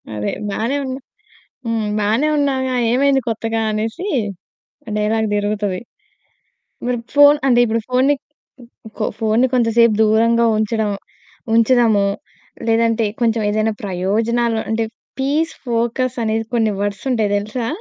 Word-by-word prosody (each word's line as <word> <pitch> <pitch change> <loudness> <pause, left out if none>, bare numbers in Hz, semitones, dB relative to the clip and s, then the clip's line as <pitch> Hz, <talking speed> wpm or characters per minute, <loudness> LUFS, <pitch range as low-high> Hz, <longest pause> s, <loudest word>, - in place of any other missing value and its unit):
అదే, 105 0 -2 0.2
బానే 230 +7 -1
ఉన్నా 260 0 -4 0.7
హ్మ్, 225 -2 -1
బానే 220 +8 +1
ఉన్నావుగా. 265 -2 0 0.2
ఏమైంది 270 +2 +3
కొత్తగా" 225 0 -1
అనేసి 225 - -3 0.9
డైలాగ్ 220 +1 +1
తిరుగుతది. 205 -2 -1 1.0
మరి 245 0 0 0.2
ఫోను 290 +1 +7
అంటే, 240 -2 +4
ఇప్పుడు 230 0 -1
ఫోనుని, 260 +3 +3 0.4
కొ - - -13 0.4
కొ - - +1
ఫోనుని 225 +3 +2
కొంచెంసేపు 230 -2 +3
దూరంగా 230 +2 +3
ఉంచడం, 215 -1 0 0.6
ఉంచుదాము, 230 -4 +4 0.6
లేదంటే 230 0 +2 0.2
కొంచెం 225 -1 +2
ఏదైనా 215 +1 0
ప్రయోజనాలు 220 +5 0
అంటే, 225 0 0 0.3
పీస్, 300 +5 0
ఫోకస్ 240 +2 -1
అనేది 220 0 -1
కొన్ని 220 -2 +2
వర్డ్సుంటాయి 205 +1 -1
తెలుసా? 215 +4 -3
230 Hz, 115 wpm, -19 LUFS, 215-250 Hz, 1.0 s, ఫోను